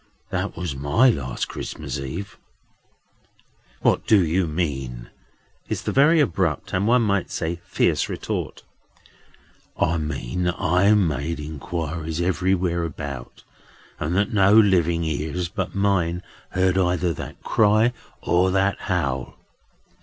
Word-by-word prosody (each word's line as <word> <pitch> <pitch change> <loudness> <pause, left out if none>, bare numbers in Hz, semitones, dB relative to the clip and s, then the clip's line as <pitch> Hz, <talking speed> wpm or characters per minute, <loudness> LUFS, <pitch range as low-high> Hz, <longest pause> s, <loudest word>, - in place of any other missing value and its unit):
That - - -2
was 85 -5 -3
my 75 - +4
last 65 - -3
Christmas - - -5
Eve." 80 +9 -6 1.4
"What - - +2
do 100 -5 +5
you 85 +2 +1
mean?" 65 -7 -3 0.6
is - - -2
the - - -1
very 150 +5 +5
abrupt, 90 - 0
and, 100 +3 +1
one 120 +1 +4
might 100 -4 0
say, 85 +1 -3
fierce - - +1
retort. - - -4 1.2
"I 80 0 +2
mean 80 +2 -3
that 90 0 -1
I 90 +5 +3
made 80 -5 0
inquiries 80 +1 -4
everywhere 90 -1 +1
about, 70 -5 -7 0.6
and, 80 +4 -1
that 100 +3 +1
no 100 -1 +5
living 85 -6 +4
ears 80 +2 -2
but 95 -2 -4
mine 90 -3 +1 0.3
heard 95 0 +1
either 90 -1 +1
that - - -9
cry 110 +3 +3 0.3
or 90 +2 +3
that 95 +1 +1
howl. 70 -9 -2
90 Hz, 125 wpm, -23 LUFS, 80-95 Hz, 1.4 s, do